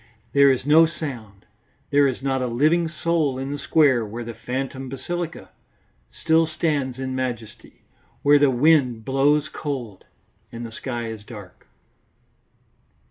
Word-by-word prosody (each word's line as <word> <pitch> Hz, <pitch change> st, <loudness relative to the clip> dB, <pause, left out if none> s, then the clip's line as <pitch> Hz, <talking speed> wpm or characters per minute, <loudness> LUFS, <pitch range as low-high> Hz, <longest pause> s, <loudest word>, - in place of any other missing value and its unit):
There 140 Hz, 0 st, +6 dB
is 130 Hz, -1 st, 0 dB
no 160 Hz, +3 st, +6 dB
sound; 120 Hz, -11 st, -8 dB, 0.5 s
there 145 Hz, 0 st, +5 dB
is 130 Hz, 0 st, -4 dB
not 135 Hz, -1 st, 0 dB
a 125 Hz, -, -1 dB
living 155 Hz, +8 st, +2 dB
soul 155 Hz, -4 st, 0 dB
in 135 Hz, +1 st, -4 dB
the 145 Hz, -, -4 dB
square 140 Hz, -7 st, +3 dB
where 110 Hz, +3 st, -6 dB
the 115 Hz, 0 st, -7 dB
phantom 130 Hz, +2 st, -5 dB
basilica 165 Hz, +5 st, -5 dB, 0.6 s
still 165 Hz, 0 st, +2 dB
stands 150 Hz, -5 st, -1 dB
in 130 Hz, 0 st, -4 dB
majesty, 120 Hz, -4 st, -6 dB, 0.4 s
where 145 Hz, 0 st, +6 dB
the 145 Hz, -1 st, +4 dB
wind 130 Hz, -4 st, +2 dB
blows 145 Hz, +3 st, +2 dB
cold 130 Hz, -11 st, -6 dB, 0.5 s
and 120 Hz, 0 st, -7 dB
the 115 Hz, -, -8 dB
sky 120 Hz, 0 st, -5 dB
is 110 Hz, -2 st, -8 dB
dark. 105 Hz, -5 st, -12 dB
135 Hz, 140 wpm, -23 LUFS, 120-150 Hz, 0.6 s, There